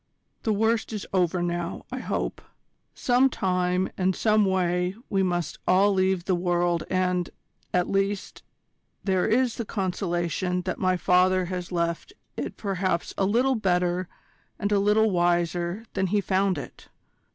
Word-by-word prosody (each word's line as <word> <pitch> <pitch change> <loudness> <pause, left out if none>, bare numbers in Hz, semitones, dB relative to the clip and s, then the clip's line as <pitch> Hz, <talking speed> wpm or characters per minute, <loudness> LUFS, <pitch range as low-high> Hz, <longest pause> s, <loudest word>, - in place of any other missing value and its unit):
"The 220 - 0
worst 220 +2 +1
is 210 - -4
over 180 -1 +1
now, 175 0 -3
I - - -3
hope. - - -3 0.5
Some 250 +2 +3
time 180 -3 0
and 185 0 +2
some 215 -1 +3
way 180 -1 0 0.2
we 195 - +2
must 175 -4 -1
all 195 +2 +4
leave 190 -2 +1
the 190 - +1
world 175 -1 +1
and, 180 -1 0 0.4
at 180 -1 +1
least, 195 0 -1 0.6
there 190 -2 +1
is 240 +1 +2
the 235 - -2
consolation 180 -2 -2
that 185 - -3
my 185 -1 +2
father 185 +1 +3
has 180 0 -5
left 170 - -2 0.2
it - - -5
perhaps 185 -4 -1
a 195 - +1
little 245 +7 +2
better 180 -4 0 0.5
and 205 0 -2
a 205 - +4
little 210 +2 +3
wiser 175 +3 0
than 190 -1 0
he 205 +3 +1
found 195 -2 +1
it. 145 - -9
185 Hz, 150 wpm, -26 LUFS, 175-200 Hz, 0.6 s, all